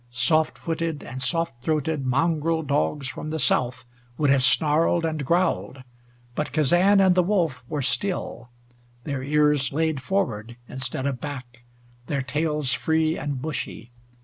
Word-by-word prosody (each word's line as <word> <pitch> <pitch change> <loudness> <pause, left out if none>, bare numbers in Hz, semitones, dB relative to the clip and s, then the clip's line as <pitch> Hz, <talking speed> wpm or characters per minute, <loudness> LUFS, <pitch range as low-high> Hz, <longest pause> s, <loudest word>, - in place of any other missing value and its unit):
Soft 155 +6 +2
footed 165 -2 -3
and 130 +2 -7
soft 165 -5 -1
throated 155 -1 0
mongrel 160 +4 +1
dogs 145 0 0
from 150 - -6
the 160 - -2
South 125 -2 +1 0.3
would 145 -2 +3
have 140 -1 +4
snarled 160 +4 +3
and 155 -2 -2
growled, 170 -4 0 0.5
but 150 - -3
Kazan 175 +7 +4
and 190 -2 +5
the 180 - +4
wolf 170 - 0
were 150 -3 -2
still, 180 -8 -2 0.5
their 140 -3 -3
ears 150 0 +2
laid 160 -1 0
forward 120 - -2
instead 130 0 -3
of 135 -3 -2
back, 125 -4 -8 0.4
their 140 -2 -1
tails 150 0 0
free 160 +4 +1
and 140 -2 -4
bushy. 150 -5 -5
150 Hz, 145 wpm, -24 LUFS, 130-160 Hz, 0.5 s, and